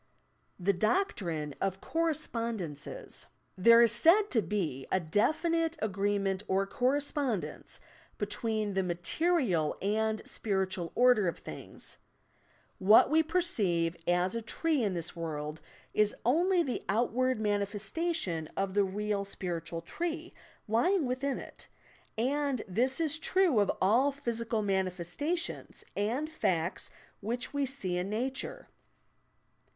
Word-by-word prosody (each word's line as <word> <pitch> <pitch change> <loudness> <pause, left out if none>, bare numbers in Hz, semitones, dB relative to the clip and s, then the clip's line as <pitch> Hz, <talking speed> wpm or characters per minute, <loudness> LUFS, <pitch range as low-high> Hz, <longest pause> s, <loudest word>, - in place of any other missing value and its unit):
THE 195 +3 +2
DOCTRINE 180 - 0
OP 195 -1 -1
"COKKESPONDENCES" 230 - -3 0.3
There 230 +5 +7
is 230 - +5
said 335 - +5
to 225 - +3
be 165 -8 -2
a 190 - +3
definite 320 - +1
agreement 200 -1 0
or 195 +1 +2
correspond 260 - 0
ence - - -6 0.4
between 215 -3 -1
the 190 - +1
material 180 - 0
and 220 +2 0
spiritual 190 -4 -2
order 245 -6 +5
of 170 - -1
things. - - -10 0.8
What 210 +7 +6
we 320 +1 +5
perceive 205 - +1
as 180 +1 +2
a 230 - -2
tree 305 +6 0
in 200 -4 0
this 170 -1 -3
world 155 -2 -4 0.3
is 210 -1 +3
only 345 +8 +3
the 255 -5 -3
out 225 +5 +2
ward 255 0 +1
manifestation 205 - -1
of 195 -1 -1
the 205 0 +4
real 205 +1 -1
spiritual 170 -4 -5
tree 335 - -4 0.3
lying 300 - +2
within 260 +2 -1
it, - - -8 0.5
and 275 +1 0
this 250 - +1
is 320 -1 +1
true 350 - +3
of 205 - +3
all 240 +9 +4
physical 230 -5 -2
manifestations 190 - -2
and 235 +9 0
facts 185 - -1 0.3
which 240 +6 -3
we 285 -1 0
see 195 -10 -2
in 180 +2 -3
nature. 260 - -3
215 Hz, 125 wpm, -31 LUFS, 190-280 Hz, 0.8 s, There